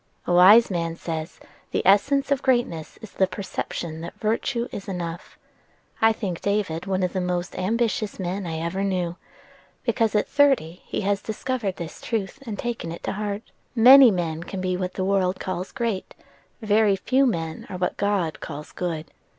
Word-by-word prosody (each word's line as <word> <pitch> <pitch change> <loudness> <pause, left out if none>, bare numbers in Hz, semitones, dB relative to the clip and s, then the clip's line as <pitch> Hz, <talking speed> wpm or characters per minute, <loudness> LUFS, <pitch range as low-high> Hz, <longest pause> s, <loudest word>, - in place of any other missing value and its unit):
"A 175 - 0
wise 200 +6 +7
man 165 -2 -1
says, 165 0 -5 0.3
'The - - -2
essence 275 +9 +4
of 280 - +2
greatness 240 - 0
is 220 - -9
the 190 - +2
perception 170 -4 -5
that 170 - -7
virtue 230 +2 -1
is 195 - -7
enough.' 175 -3 -5 0.6
I 225 0 +6
think 195 -6 -4
David 200 -4 -1
one 190 -1 0
of 180 - -1
the 185 - -1
most 180 0 -2
ambitious 215 +1 -1
men 185 +1 -3
I 160 -1 -3
ever 170 +4 -2
knew, 180 -3 -1 0.7
because 225 -3 +1
at 210 - +2
thirty 265 - +2
he - - -2
has 200 0 0
discovered 220 -2 -3
this 170 -2 -8
truth, 225 +1 -3
and 210 -3 -4
taken 235 -9 -4
it 170 - -8
to - - -2
heart. 205 +1 -3 0.3
Many 255 +2 +9
men 165 -5 -2
can 185 +2 -6
be 185 0 -1
what 180 0 -3
the 185 - -1
world 190 -1 +1
calls 185 0 -4
great: 230 -7 -3 0.5
very 210 -1 +4
few 260 +7 +2
men 165 -7 -3
are 185 - -5
what 180 0 -1
God 195 -6 0
calls 150 -1 -7
good. 165 -3 -4
190 Hz, 175 wpm, -24 LUFS, 175-220 Hz, 0.7 s, Many